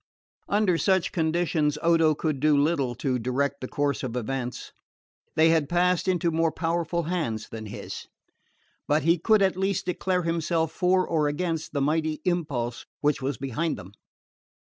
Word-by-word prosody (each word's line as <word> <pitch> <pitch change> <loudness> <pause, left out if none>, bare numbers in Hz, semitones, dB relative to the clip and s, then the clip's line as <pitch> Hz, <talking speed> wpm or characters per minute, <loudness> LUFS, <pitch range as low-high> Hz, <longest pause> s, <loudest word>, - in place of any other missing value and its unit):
Under 200 -5 +2
such 190 -3 +2
conditions 160 -3 +1
Odo 165 -2 +4
could 150 -2 -2
do 150 +1 +4
little 140 -4 +1
to 130 +1 -1
direct 140 +4 -1
the 130 - -4
course 145 +1 -1
of 125 -3 -4
events. 125 +1 -4 0.6
They 160 +1 +5
had 160 -3 +2
passed 180 +1 +2
into 175 -2 +1
more 165 0 +1
powerful 170 +1 -1
hands 155 -11 -2
than 110 -1 -7
his. 105 - -7 0.8
But 150 0 +2
he 165 +2 +3
could 215 +3 +4
at 190 -2 +2
least 195 +1 -1
declare 180 0 0
himself 165 -1 0
for 185 +2 +2
or 155 -3 +1
against 160 +1 -2
the 140 - 0
mighty 155 +2 0
impulse 140 -10 -2
which 145 -1 +1
was 135 0 -2
behind 140 +4 -2
them. 95 -1 -10
160 Hz, 160 wpm, -26 LUFS, 140-175 Hz, 0.8 s, They